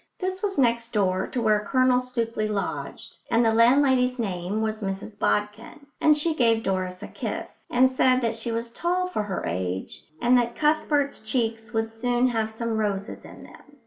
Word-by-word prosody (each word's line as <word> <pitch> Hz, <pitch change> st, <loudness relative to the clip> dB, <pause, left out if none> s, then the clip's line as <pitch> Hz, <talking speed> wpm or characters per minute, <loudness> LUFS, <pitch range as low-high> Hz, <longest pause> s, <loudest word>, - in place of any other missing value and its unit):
This 375 Hz, 0 st, -3 dB
was 405 Hz, -2 st, -2 dB
next 235 Hz, -2 st, +1 dB
door 190 Hz, -3 st, +1 dB
to 250 Hz, -, -3 dB
where 215 Hz, -1 st, +3 dB
Colonel 255 Hz, +3 st, +2 dB
Stookley 230 Hz, -3 st, -2 dB
lodged, 205 Hz, -2 st, -4 dB
and 230 Hz, +1 st, +3 dB
the 225 Hz, -, +3 dB
landlady's 250 Hz, +2 st, +4 dB
name 195 Hz, -2 st, -2 dB
was 215 Hz, 0 st, -2 dB
Mrs 200 Hz, +2 st, -5 dB
Bodkin; 210 Hz, +7 st, -2 dB, 0.2 s
and 305 Hz, -1 st, +5 dB
she 320 Hz, +2 st, +1 dB
gave 230 Hz, -6 st, +2 dB
Doris 185 Hz, -1 st, -2 dB
a -, -, -6 dB
kiss, -, -, -6 dB
and 255 Hz, +1 st, +5 dB
said 255 Hz, 0 st, +3 dB
that 230 Hz, -2 st, 0 dB
she 225 Hz, +1 st, -3 dB
was 230 Hz, +1 st, -3 dB
tall 355 Hz, +7 st, 0 dB
for 365 Hz, -12 st, -2 dB
her 205 Hz, -2 st, -4 dB
age 90 Hz, +2 st, -4 dB, 0.2 s
and 245 Hz, +1 st, +4 dB
that 235 Hz, 0 st, -2 dB
Cuthbert's 300 Hz, -2 st, +1 dB
cheeks 225 Hz, 0 st, -2 dB
would 225 Hz, -1 st, -2 dB
soon 245 Hz, +2 st, +1 dB
have 225 Hz, -2 st, -1 dB
some 225 Hz, 0 st, -3 dB
roses 200 Hz, -1 st, -3 dB
in -, -, -12 dB
them. 290 Hz, -1 st, -16 dB
230 Hz, 180 wpm, -25 LUFS, 215-255 Hz, 0.2 s, and